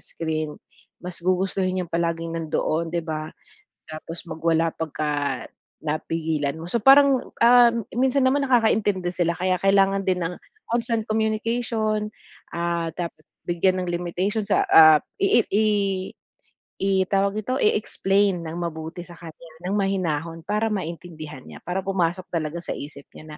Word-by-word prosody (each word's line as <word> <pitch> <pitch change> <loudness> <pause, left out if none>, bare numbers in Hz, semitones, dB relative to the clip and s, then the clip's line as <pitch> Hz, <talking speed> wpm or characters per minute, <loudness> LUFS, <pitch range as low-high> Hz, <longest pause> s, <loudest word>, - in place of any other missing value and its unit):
screen, 155 -2 -4 0.4
mas 180 -1 -7
gugustuhin 185 +1 0
niyang 180 -2 -4
palaging 165 0 -1
nandoon, 160 0 -1
'di 170 0 -2
ba? 155 -1 -4 0.6
Tapos 160 +2 -7
magwala 165 0 +1
pagka 145 -4 -2 0.4
napigilan 155 -1 -2
mo. 165 - -7
So 235 - +1
parang, 270 +2 +6
um, 240 0 +6 0.2
minsan 260 +2 +2
naman 270 +2 +3
nakakaintindi 220 -8 +2
sila 170 -1 0
kaya 185 0 0
kailangan 195 0 +3
din 180 -2 +1
ng 180 - -3 0.3
constant 230 -1 0
communication. 220 0 -1 0.4
Ah, 170 -1 -1
dapat 175 -2 -5 0.2
bigyan 185 +2 +1
ng - - -5
limitation 180 +5 -1
sa 200 0 +2
ah, 155 -1 +8 0.2
ii 195 - +4
i 215 +2 +3 1.2
i 195 - +1 0.2
tawag 200 +1 +1
dito, 255 +5 -2
i-explain 200 -3 +1
nang 165 +1 -6
mabuti 165 0 -5
sa 175 - -12
kanya, 165 0 -12
nang 190 +3 -1
mahinahon 165 -5 -1
para 210 +6 0
maintindihan 160 -6 -6
niya, - - -12
para 180 +2 -2
pumasok 185 -2 0
talaga 160 -1 -2
sa 170 - -5
isip 140 -1 -9
niya 155 -1 -11
175 Hz, 140 wpm, -24 LUFS, 165-205 Hz, 1.2 s, ah